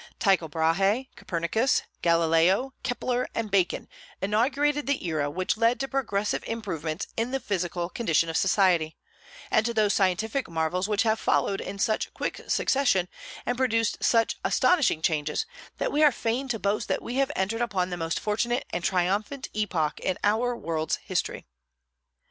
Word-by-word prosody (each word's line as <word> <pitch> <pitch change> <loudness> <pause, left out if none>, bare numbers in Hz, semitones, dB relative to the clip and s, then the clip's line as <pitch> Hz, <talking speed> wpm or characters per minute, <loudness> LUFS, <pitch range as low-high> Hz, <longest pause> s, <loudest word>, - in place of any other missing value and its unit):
Tycho 190 -5 +2
Brahe, 195 - +1
Copernicus, 180 +10 0 0.2
Galileo, 170 +9 +3
Kepler, 250 0 -1
and 220 -3 -2
Bacon 190 -3 +1 0.3
inaugurated 270 +9 +1
the 280 -8 -1
era 155 -4 0
which 185 +6 -1
led 230 +2 +2
to 270 - -2
progressive 210 -7 -1
improvements 180 -7 -3
in 230 +2 -1
the 270 +1 -1
physical 180 -7 -2
condition 165 -5 +1
of 165 - -4
society, 180 -5 +2 0.5
and 215 - +4
to 235 +1 -2
those 210 -2 +3
scientific 215 +7 0
marvels 165 +3 -1
which 210 0 +2
have 220 -1 +1
followed 195 - +1
in 200 - -6
such 215 +2 0
quick - - -3
succession 220 -10 +2 0.4
and 245 - -1
produced 230 -4 +1
such 230 -1 +3
astonishing 305 - +3
changes 155 - 0 0.3
that - - -1
we 295 - +1
are 300 - +7
fain 240 +3 -2
to 240 -3 -1
boast 205 0 -1
that - - -1
we 245 +2 -4
have 275 +1 +2
entered 205 +5 -1
upon 185 -6 -1
the - - -1
most 165 -1 -2
fortunate 235 +4 -1
and 175 +1 -3
triumphant 195 +9 0
epoch 175 -8 -1
in 185 - -1
our 230 +4 +2
world's 160 -4 -1
history. - - -3
205 Hz, 160 wpm, -27 LUFS, 175-240 Hz, 0.5 s, are